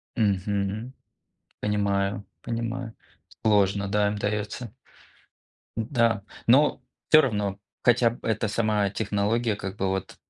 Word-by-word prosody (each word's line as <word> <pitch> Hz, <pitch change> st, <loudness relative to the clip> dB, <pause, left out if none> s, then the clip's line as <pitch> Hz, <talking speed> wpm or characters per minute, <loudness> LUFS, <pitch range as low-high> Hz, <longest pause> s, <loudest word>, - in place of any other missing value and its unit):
Мгм. 100 Hz, +3 st, 0 dB, 0.7 s
Понимаю 100 Hz, -1 st, 0 dB, 0.2 s
понимаю, 115 Hz, 0 st, -4 dB, 0.5 s
сложно, 100 Hz, -2 st, +3 dB
да, 105 Hz, +1 st, +2 dB
им 105 Hz, -, -3 dB
даётся. 105 Hz, +2 st, -3 dB, 1.0 s
Да, 115 Hz, -2 st, +1 dB, 0.2 s
но 135 Hz, +2 st, +5 dB, 0.3 s
всё 155 Hz, 0 st, +8 dB
равно, 105 Hz, -6 st, -1 dB, 0.2 s
хотя 120 Hz, -1 st, +5 dB
б 120 Hz, -, -11 dB
эта 110 Hz, 0 st, 0 dB
сама 105 Hz, -2 st, +1 dB
технология, 105 Hz, +2 st, 0 dB
как 95 Hz, -1 st, -5 dB
бы, 95 Hz, -2 st, -1 dB
вот, 95 Hz, -1 st, -3 dB
105 Hz, 110 wpm, -26 LUFS, 100-115 Hz, 1.0 s, всё